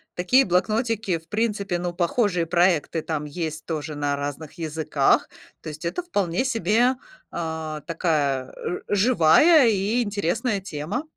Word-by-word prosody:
такие 250 +10 +3
блокнотики, 215 +1 0
в 165 - -17
принципе 210 -4 -1
ну 175 0 -3
похожие 180 0 0
проекты 170 -2 +1
там 155 -2 -3
есть 155 0 -5
тоже 155 -2 -4
на 145 -1 -1
разных 145 +2 -5
языках. 160 -2 +1 0.3
То - - -7
есть 150 +1 -9
это 170 - -2
вполне 200 - -1
себе, 235 +2 +2 0.4
а, 160 -2 -4
такая, 145 -6 -1
э, 180 - -4
живая 235 - +5
и 215 +4 +1
интересная 200 +1 -1
тема. 180 - -4
175 Hz, 135 wpm, -24 LUFS, 155-215 Hz, 0.4 s, живая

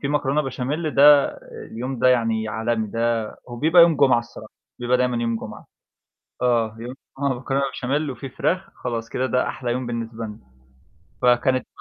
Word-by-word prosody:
في 140 - -2
مكرونة 145 0 +1
بشاميل 145 +4 -3
ده 145 0 +7 0.5
اليوم 125 +2 -4
ده 130 - +4
يعني 115 -3 +1
عالمي 110 0 -1
ده 115 -1 -1 0.2
هو 120 - -7
بيبقى 165 +6 +6
يوم 165 -3 +5
جمعة 130 -4 +4
الصراحة، 115 -2 -10 0.3
بيبقى 125 +1 +1
دايمًا 125 -1 0
يوم 115 -1 0
جمعة. - - -9 0.8
آه 115 -3 +1
يوم 120 +2 -6 0.3
جمعة 140 -1 +1
مكرونة 135 +2 -1
بشاميل 140 +3 -1
وفي 135 +1 -8
فراخ، 185 +8 -1
خلاص 115 -2 -3
كده 130 - -1
ده 125 -1 0
أحلى 120 -2 -3
يوم 125 +1 -2
بالنسبة 115 -1 -4
لنا، 105 -1 -9 0.8
فكانت 125 +1 +3
125 Hz, 170 wpm, -22 LUFS, 115-140 Hz, 0.8 s, ده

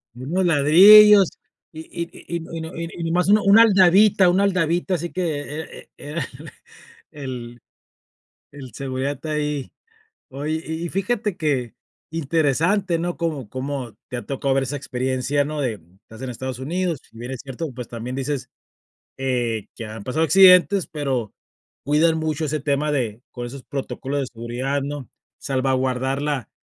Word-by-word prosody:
Unos 165 +9 -1
ladrillos 195 +6 +8 0.4
y 155 - -10
y 170 0 -5
y 170 - -8
y 170 - -1
no 165 - -11
y 165 - -4
no, 160 +1 -6 0.2
y 170 - -6
nomás 175 +3 +1
un 210 - +7
una 205 +3 +6
aldabita 195 -2 +5
una 190 +3 +3
aldabita 180 -1 +1
así 170 +1 -4
que 185 - -3 0.4
e - - -12
e 145 - -10
era 150 -3 -3 0.8
el 125 -4 -7 0.9
el 135 -4 -10
seguridad 135 +1 -3
está 155 +3 -6
ahí. 150 -2 -2 0.6
Oye, 150 +4 -3
y 160 +2 -4
y 170 - -4
fíjate 205 +1 -1
qué 135 -7 -1 0.4
interesante, 165 +4 +1
¿no?, 175 +1 -3
cómo 150 -9 -3
cómo 130 -4 -5
te 125 - -4
ha - - -7
tocado 135 0 -1
ver 135 0 +1
esa 135 +2 -4
experiencia, 130 +2 -1
¿no?, 150 0 -4
de, 115 -6 -2
mm, 90 +4 -27
estás 110 +3 -14
en 130 - -4
Estados 130 +1 -5
Unidos, 170 +2 -2
si 115 - -19
bien 120 +3 -7
es 130 - -5
cierto, 140 +2 -6
pues 125 -1 -7
también 120 +2 -6
dices, 135 0 -3 0.7
eh, 120 -5 -1
que 115 - -7
han 110 -1 -8
pasado 155 +6 0
accidentes, 190 +1 +6
pero 135 -8 -3 0.5
cuidas 155 +3 +3
mucho 155 0 -2
ese 155 +1 -2
tema 145 +1 0
de 120 -4 -2
con 120 -1 -6
esos 130 +2 -9
protocolos 140 0 -4
de 135 - -2
seguridad, 125 +4 -3
¿no?, 140 -2 -6 0.3
salvaguardar 130 0 -1
la 145 -6 -2
145 Hz, 165 wpm, -22 LUFS, 130-170 Hz, 0.9 s, ladrillos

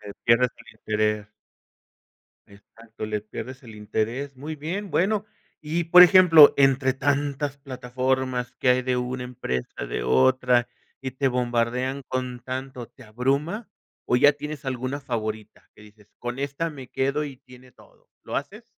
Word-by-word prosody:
Que 105 - -11
le 100 - -8
pierdes 115 +1 +4
el - - -17
interés. 105 -1 -1 1.2
Exacto, 110 +2 -11
le 105 -1 -2
pierdes 130 +5 -8
el 115 -3 -12
interés, 115 +6 -3
muy 150 +4 -6
bien, 175 +7 -5
bueno, 205 +5 +1 0.4
y, 165 +3 -1
por 175 +2 +9
ejemplo, 180 -5 +8
entre 135 -1 +4
tantas 140 +1 -1
plataformas 130 -1 -2
que - - +1
hay 125 0 +4
de 125 0 0
una 125 0 -3
empresa, 65 - -5
de - - -3
otra, 120 - +3 0.3
y 130 -2 -5
te 135 +1 0
bombardean 125 +2 -1
con 125 -1 -4
tanto, 130 0 -6
¿te 130 - -18
abruma 140 - -2 0.4
o 125 - +3
ya 145 +4 +6
tienes 150 0 -7
alguna 130 +2 -3
favorita 110 -4 -5
que - - -19
dices: 105 -1 -19
"Con 120 +1 -5
esta 140 +4 -2
me 135 -5 -10
quedo 140 +3 -1
y 140 -3 -8
tiene 125 0 -17
todo", - - -23
lo - - -5
haces? - - -5
130 Hz, 155 wpm, -24 LUFS, 120-140 Hz, 1.2 s, por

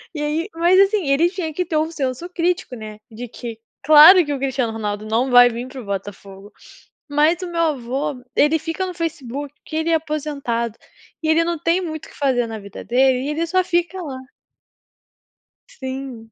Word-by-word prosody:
E 295 - -3
aí 310 +6 -2
mas, 345 +3 +4
assim, 395 -2 +3
ele 305 +5 +3
tinha 350 -4 -5
que 360 +4 -2
ter 320 -2 -1
um 315 +1 0
senso 280 +2 -3
crítico, 350 -6 -1
né, 215 -2 -9
de 235 +3 -7
que 230 -1 -8 0.3
claro 310 +5 +9
que 290 - -2
o 275 - -4
Cristiano 260 -4 -1
Ronaldo 210 -1 -4
não 230 +4 0
vai 245 0 +8
vim 240 +2 -6
para 260 0 -9
o - - -12
Botafogo. 200 0 -7 0.6
Mas 305 +5 +2
o - - -4
meu 335 -1 0
avô 270 -3 -2
ele 300 +2 +3
fica 325 +4 -3
no 365 - -5
Facebook, 290 -4 -5
que - - -7
ele 320 +1 -1
é - - +4
aposentado 280 -7 -3 0.5
e 315 - -1
ele 325 +1 +4
não 340 0 -2
tem 335 +4 +1
muito 320 -2 -6
o - - -16
que - - -17
fazer 255 -4 +1
na 225 -1 -6
vida 200 -1 -10
dele 255 +1 +3
e 285 - -3
ele 320 +3 -1
só 370 +2 +2
fica 350 +1 -1
lá. 275 -6 -6 1.5
Sim. 260 -4 -7
290 Hz, 200 wpm, -20 LUFS, 245-330 Hz, 1.5 s, claro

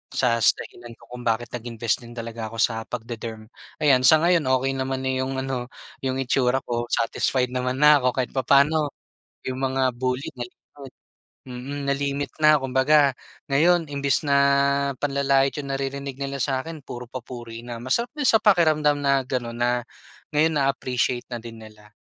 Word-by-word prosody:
sa 120 -3 +2
dahilan 120 +3 0
ko - - -18
kung 125 0 -8
bakit 115 +1 0
nag-invest 115 -2 -2
din 120 0 -12
talaga 115 -1 -5
ako 115 - -8
sa 115 -2 +1
pagde-derm. 115 -2 -6 0.4
Ayan, 135 -4 +5
sa 155 - +8
ngayon 170 -3 +3
okey 135 +1 -1
naman 130 0 -2
na 130 - +1
yung 135 +1 -3
ano 130 -2 -3 0.3
yung 130 -1 -1
itsura 130 0 +1
ko. 120 0 -2
Satisfied 125 +2 0
naman 125 0 -1
na 150 -1 +7
ako 125 0 +1
kahit 130 -2 -1
papaano 140 +4 +3 0.6
yung 130 0 -3
mga 130 -1 +1
bully 130 +1 -2
na 120 - -3
limit, 135 +2 -15 0.6
mm, 130 +3 -6
na-limit 140 0 -2
na. 150 0 +7
Kumbaga, 135 +2 +3 0.4
ngayon 165 +3 +3
imbis 140 -1 0
na 140 -1 +3 0.6
panlalait 140 -1 +2
yung 140 -1 -5
naririnig 135 0 -4
nila 140 0 -3
sa 130 +1 0
akin, 160 0 -9
puro 125 0 -7
papuri 120 -2 -8
na. 120 -1 -7
Masarap 235 - 0
din 295 -2 -1
sa 220 - +6
pakiramdam 155 -7 +3
na 140 -1 +2
ganun 120 -3 -3
na, 120 0 +1 0.5
ngayon 160 +2 +3
na-appreciate 130 -2 -1
na 120 - -3
din 115 -1 -10
nila. 105 -1 -15
130 Hz, 165 wpm, -24 LUFS, 120-140 Hz, 0.6 s, sa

